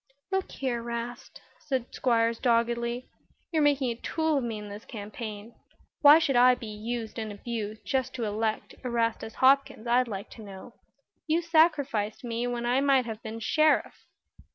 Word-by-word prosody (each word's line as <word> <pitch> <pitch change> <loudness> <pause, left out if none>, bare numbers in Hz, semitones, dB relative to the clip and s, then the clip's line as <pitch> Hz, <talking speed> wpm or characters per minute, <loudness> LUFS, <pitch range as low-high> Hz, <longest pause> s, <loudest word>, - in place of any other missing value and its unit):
"Look 385 -1 -1
here, 250 -3 -2
'Rast," 235 +1 -6 0.2
said 260 -5 -3
Squiers, 230 -2 +1
doggedly, 235 0 +1 0.4
"you're 320 -2 +2
making 280 -4 +2
a 230 - -8
tool 320 -2 0
of - - -4
me 230 -2 -3
in 210 0 -8
this 205 +2 -9
campaign. 215 0 -7 0.5
Why 295 0 +9
should 320 -5 +1
I 250 +1 +6
be 245 - -9
used 220 +1 -5
and 220 -1 -4
abused 215 0 -5
just 260 -2 -1
to 245 - -3
elect 215 +1 -2
Erastus 230 -2 -1
Hopkins, 275 -2 +3
I'd 245 +1 +3
like 200 -3 -6
to 225 - -11
know. 200 +4 -11 0.5
You 325 +2 +1
sacrificed 285 -11 +2
me 235 0 -2
when 240 -1 -3
I 250 +3 +2
might 275 -3 +3
have 225 -1 -6
been 220 +1 -6
Sheriff." 310 +7 +1
235 Hz, 165 wpm, -28 LUFS, 225-270 Hz, 0.5 s, Why